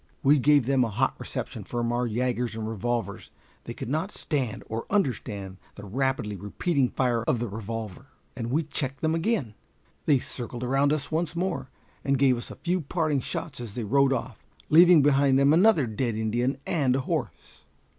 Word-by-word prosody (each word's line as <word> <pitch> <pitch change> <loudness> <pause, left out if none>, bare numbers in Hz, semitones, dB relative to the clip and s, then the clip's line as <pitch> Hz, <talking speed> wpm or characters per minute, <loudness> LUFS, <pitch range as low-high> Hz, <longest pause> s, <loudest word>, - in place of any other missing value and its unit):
We 145 +1 +5
gave 145 -1 +4
them 135 0 +3
a 115 - -1
hot 105 - +1
reception - - -5
from 120 -1 -2
our 120 0 0
yagers 120 0 -1
and 110 -1 -4
revolvers. 115 -1 -3 0.4
They - - -6
could - - -6
not 160 - -1
stand 135 - -3
or 115 +1 -5
understand 105 - -1 0.2
the 100 - -10
rapidly 130 -1 -1
repeating 125 - 0
fire 120 -3 0
of 125 - +2
the 120 +1 -2
revolver, 110 +2 -6 0.3
and 120 -2 -4
we 155 +6 +1
checked 140 -2 -3
them 160 0 +1
again. 165 - 0 0.5
They 145 - +5
circled 120 -1 -5
around 135 +3 +2
us 155 -1 -1
once 165 0 -1
more, 170 -8 -2 0.3
and 140 0 +1
gave 130 -1 +4
us 120 - -6
a - - -8
few 180 +1 -1
parting 155 -1 0
shots 135 +2 -5
as 115 -4 -7
they 120 - -3
rode 135 +5 +3
off, 125 -3 -3 0.3
leaving 170 -1 +7
behind 140 -1 +4
them 140 +2 +5
another 175 - +5
dead 115 +1 -2
Indian 120 +4 0
and 135 -6 +1
a 135 - 0
horse. - - -5
130 Hz, 185 wpm, -26 LUFS, 115-145 Hz, 0.5 s, leaving